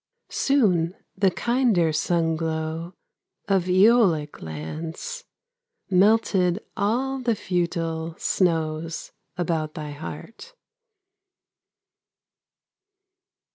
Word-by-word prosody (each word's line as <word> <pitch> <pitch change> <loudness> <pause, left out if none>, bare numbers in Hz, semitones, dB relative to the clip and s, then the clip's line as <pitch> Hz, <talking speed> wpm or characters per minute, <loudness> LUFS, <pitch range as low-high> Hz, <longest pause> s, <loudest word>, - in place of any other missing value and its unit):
Soon 190 - +2 0.2
the 195 0 +3
kinder 230 -6 +2
sunglow 160 +1 -1 0.5
Of 195 -3 +2
Æolic 185 -5 +4
lands 160 - -6 0.7
Melted 190 -2 +3 0.2
all 255 +7 0
the 240 -3 +1
futile 170 -3 -2
Snows 165 -2 -1 0.3
about 160 -3 -1
thy 150 -3 -5
heart. 225 - -9
175 Hz, 65 wpm, -24 LUFS, 160-210 Hz, 0.7 s, Æolic